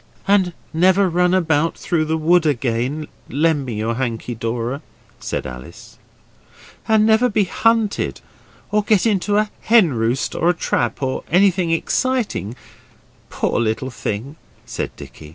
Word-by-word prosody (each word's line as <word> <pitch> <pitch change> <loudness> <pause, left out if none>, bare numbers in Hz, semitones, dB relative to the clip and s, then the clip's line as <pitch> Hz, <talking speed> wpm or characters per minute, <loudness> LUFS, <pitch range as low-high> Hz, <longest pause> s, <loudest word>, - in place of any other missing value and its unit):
'And 195 -3 +3 0.2
never 185 +4 +4
run 180 +1 +2
about 165 -3 +1
through 160 -3 0
the 160 +1 0
wood 170 +2 +3
again, 130 +2 -1 0.2
lend 150 -1 +1
me 120 - -4
your 110 +2 -1
hanky, 120 -1 -3
Dora' 115 +4 -3 0.4
said - - -4
Alice. 65 0 -10 0.9
'And 220 -1 +4
never 220 +3 +4
be 210 -1 +2
hunted 225 +2 0 0.5
or 210 +1 +3
get 210 -1 +2
into 205 -1 +1
a 215 0 +1
hen 215 - +4
roost 115 0 -1
or 170 - +1
a 175 - +2
trap 120 -4 -1
or 130 0 -2
anything 185 0 +3
exciting, 200 - -1 0.7
poor - - -1
little 120 +3 -1
thing,' 120 +6 -5 0.3
said - - -4
Dicky. 75 - -12
160 Hz, 140 wpm, -20 LUFS, 120-195 Hz, 0.9 s, never